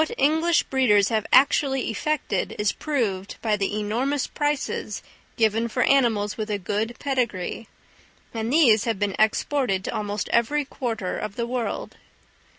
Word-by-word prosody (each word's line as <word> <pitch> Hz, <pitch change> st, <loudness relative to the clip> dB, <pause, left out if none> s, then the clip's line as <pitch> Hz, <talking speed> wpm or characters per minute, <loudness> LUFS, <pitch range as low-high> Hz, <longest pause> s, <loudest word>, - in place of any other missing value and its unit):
What 315 Hz, -, -5 dB
English 320 Hz, +4 st, +3 dB
breeders 210 Hz, -7 st, +3 dB
have 220 Hz, -2 st, -1 dB
actually 270 Hz, -2 st, +3 dB
effected 300 Hz, +7 st, -2 dB
is 210 Hz, -1 st, +1 dB
proved 215 Hz, -10 st, -2 dB
by 215 Hz, -2 st, +1 dB
the 205 Hz, +1 st, -2 dB
enormous 250 Hz, +7 st, -1 dB
prices 295 Hz, -2 st, -2 dB, 0.3 s
given 225 Hz, 0 st, +2 dB
for 250 Hz, +2 st, 0 dB
animals 225 Hz, -7 st, +2 dB
with 215 Hz, -1 st, -4 dB
a 210 Hz, -, 0 dB
good 210 Hz, +5 st, -2 dB
pedigree; 235 Hz, -7 st, -2 dB, 0.7 s
and 225 Hz, 0 st, -3 dB
these 245 Hz, -9 st, +5 dB
have 230 Hz, -3 st, 0 dB
been 200 Hz, -1 st, -1 dB
exported 220 Hz, -2 st, +1 dB
to -, -, -4 dB
almost 205 Hz, 0 st, -3 dB
every 285 Hz, +5 st, +1 dB
quarter 230 Hz, -8 st, -4 dB
of 215 Hz, -2 st, -5 dB
the 235 Hz, -, -2 dB
world. 240 Hz, -1 st, -4 dB
230 Hz, 150 wpm, -24 LUFS, 210-270 Hz, 0.7 s, these